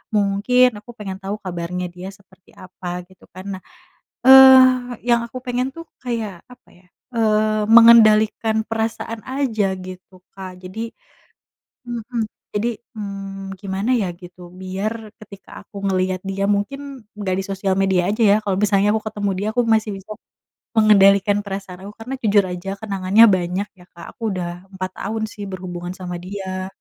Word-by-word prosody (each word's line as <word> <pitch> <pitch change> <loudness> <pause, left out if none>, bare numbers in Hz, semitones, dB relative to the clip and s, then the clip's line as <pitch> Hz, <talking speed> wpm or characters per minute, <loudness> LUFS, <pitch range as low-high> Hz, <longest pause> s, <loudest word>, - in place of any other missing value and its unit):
mungkin 210 +5 +3
aku 225 +3 -13
pengen 195 -3 -6
tau 200 +2 -3
kabarnya 180 0 -4
dia 180 +2 -9
seperti 190 -1 -23
apa 180 -1 -7
gitu 185 -1 -20
kan 185 - -9
nah, 185 - -16 0.6
eee, 260 -2 +7
yang 235 0 +4
aku 255 - -9
pengen 250 +1 -1
tuh 330 - -8 0.2
kayak 225 -7 -4
apa 250 0 -18
ya, 180 - -26 0.3
eee, 215 -1 +2
mengendalikan 220 -1 +6
perasaan 225 0 -3
aja 225 -8 -1
gitu 185 0 -12
Kak 190 -1 -8
jadi 185 +5 -7 1.1
heeh, 240 0 -4 0.3
jadi, 220 +3 0 0.3
mmm, 195 -1 -6
gimana 195 +3 -3
ya 190 - -1
gitu 180 0 -13 0.2
biar 190 +4 -3 0.3
ketika 200 -2 -14
aku 210 - -17
ngeliat 185 -1 0
dia 195 +1 -2
mungkin 270 +4 -3
nggak 190 -3 -1
di 195 - -2
sosial 195 -1 -1
media 190 -2 +2
aja 215 +3 -1
ya 205 - +6
kalau 195 -2 0
misalnya 200 -1 +3
aku 220 - -1
ketemu 205 -2 -2
dia 205 +2 -2
aku 245 - +3
masih 215 -1 0
bisa 195 +3 -16 0.7
mengendalikan 200 -2 +5
perasaan 195 -2 -6
aku 205 - -10
karena 250 +4 -5
jujur 205 -2 +4
aja 180 +2 -6
kenangannya 200 +1 +4
banyak 180 +3 -2
ya - - -15
Kak 170 -1 -11
aku - - -34
udah 180 -2 -3 0.3
4 185 0 -4
tahun 220 +2 -3
sih 205 - -8
berhubungan 180 -1 -6
sama 180 -1 -5
dia, 185 -1 -5
200 Hz, 155 wpm, -20 LUFS, 185-225 Hz, 1.1 s, eee